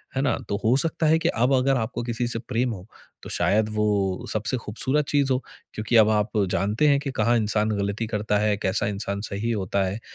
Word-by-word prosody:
है 135 - +1
ना? 140 - +1
तो 100 - 0
हो 115 +3 +4
सकता 165 +2 -1
है 160 +1 +5
कि - - +1
अब 125 +4 +1
अगर 135 +1 +3
आपको 120 +1 -3
किसी 120 0 -2
से 120 -1 -3
प्रेम 120 +1 -1
हो, 95 +1 -10 0.4
तो - - -8
शायद 110 +1 +1
वो 100 -3 0
सबसे 110 +4 -1
खूबसूरत 130 +7 -1
चीज़ 140 -2 +2
हो, - - +2 0.4
क्योंकि 110 +2 -2
अब 110 -1 +6
आप 105 0 +1 0.2
जानते 105 +10 +1
हैं 140 -1 +4
कि 140 -1 -4
कहाँ 120 0 +2
इंसान 105 0 +1
गलती 100 +3 -2
करता 105 -1 0
है, 105 -1 +1
कैसा 95 0 0
इंसान 100 0 -3
सही 105 +4 -2
होता 100 -2 0
है। 100 +4 -3
110 Hz, 220 wpm, -24 LUFS, 105-125 Hz, 0.4 s, अब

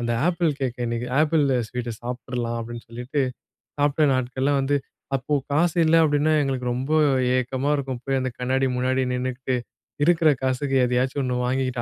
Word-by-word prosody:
அந்த 120 0 -1 0.2
apple 170 -3 +1
cake 130 -2 -2
இன்னைக்கு. 120 +1 -2
Apple 155 -1 +3 0.2
ஸ்வீட்ட 125 0 -4
சாப்பிட்ர்லாம் 120 -1 -4
அப்டின்னு 120 0 -8
சொல்லிட்டு, 125 +5 -3 0.6
சாப்பிட்ட 145 +1 +2
நாட்கள்லாம் 130 +2 0
வந்து 140 +2 +1 0.4
அப்ப 140 +3 0
காசு 165 +4 +2
இல்ல 160 +1 +4
அப்டின்னா 150 +1 +2
எங்களுக்கு 130 -3 -2
ரொம்ப 130 +4 -3 0.5
ஏக்கமா 130 +2 -1
இருக்கும். 135 -4 -4
போய் 135 -1 0
அந்த 130 - -1
கண்ணாடி 130 +2 +1
முன்னாடி 130 +1 +1
நின்னுகிட்டு, 130 +1 -2 0.5
இருக்குற 165 -1 +4
காசுக்கு 135 +1 0
எதையாச்சும் 125 +3 0
ஒண்ணு 125 -1 -1
வாங்கிக்கிட்டு 130 -1 -1
130 Hz, 150 wpm, -24 LUFS, 125-145 Hz, 0.6 s, இல்ல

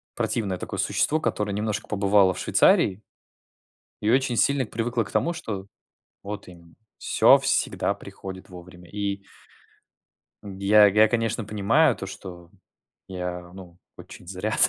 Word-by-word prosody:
противное 100 -5 -1
такое - - -6
существо, 155 - +1
которое 105 -9 -2
немножко 105 +1 -3
побывало 100 -2 +3
в - - -7
Швейцарии 95 +2 +3 1.0
и 105 - +1
очень 125 0 +2
сильно 140 +1 +2
привыкло 115 +2 -2
к - - -11
тому, 170 - 0
что 105 - -6 0.6
вот 105 0 -7
именно, 85 -2 -16 0.2
всё - - +5
всегда - - 0
приходит 95 0 -10
вовремя. 90 -1 -13
И 100 -1 -4 1.2
Я 100 +1 +4
я, 105 +2 +5
конечно, 115 0 -1
понимаю, 110 +10 +2
то - - -7
что 90 -3 -10 0.6
я, 90 -1 -6
ну, 90 -2 -13 0.2
очень 90 - -13
зря, 95 +5 -3
100 Hz, 130 wpm, -24 LUFS, 95-110 Hz, 1.2 s, всё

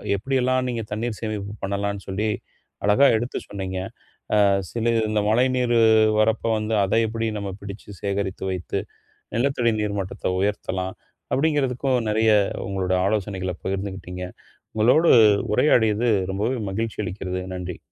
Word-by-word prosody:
எப்படி 135 +8 -2
எல்லாம் 130 0 +1
நீங்கத் 115 -3 -4
தண்ணீர் 110 +1 -3
சேமிப்பு 105 -2 -4
பண்ணலாம்ன்னு 100 0 -2
சொல்லி, 105 +3 -1 0.6
அழகா 105 +7 +5
எடுத்து 120 +3 -3
சொன்னீங்க. 95 -2 -4 0.6
"அ 100 - +6 0.3
சில 115 0 0 0.2
இந்த 105 -1 +1
மழை 120 +4 +4
நீரு 120 -2 +2 0.4
வரப்ப 110 +1 +2
வந்து, 110 +1 -1
அதை 100 +4 +2
எப்படி 115 +1 -3
நம்ம 100 -1 -4
பிடிச்சு 100 +1 -9
சேகரித்து 100 -1 -2
வைத்து 90 -3 -3 0.6
நிலத்தடி 120 -2 +2
நீர்மட்டத்தை 100 -3 -2
உயர்த்தலாம்?" 95 -2 -2 0.4
அப்படிங்கறதுக்கும் 135 -3 +1
நெறைய 110 +1 +3 0.4
உங்களோட 95 -1 -2
ஆலோசனைகளை 95 -3 -1
பகிர்ந்துக்கிட்டீங்க. 95 -2 -4 0.5
உங்களோடு 125 +10 +5 0.4
உரையாடியது 115 -3 +3 0.2
ரொம்பவே 110 +7 -1
மகிழ்ச்சி 110 +2 -3
அளிக்கிறது. 95 0 -4
நன்றி. 90 -1 -5
105 Hz, 125 wpm, -23 LUFS, 95-115 Hz, 0.6 s, அ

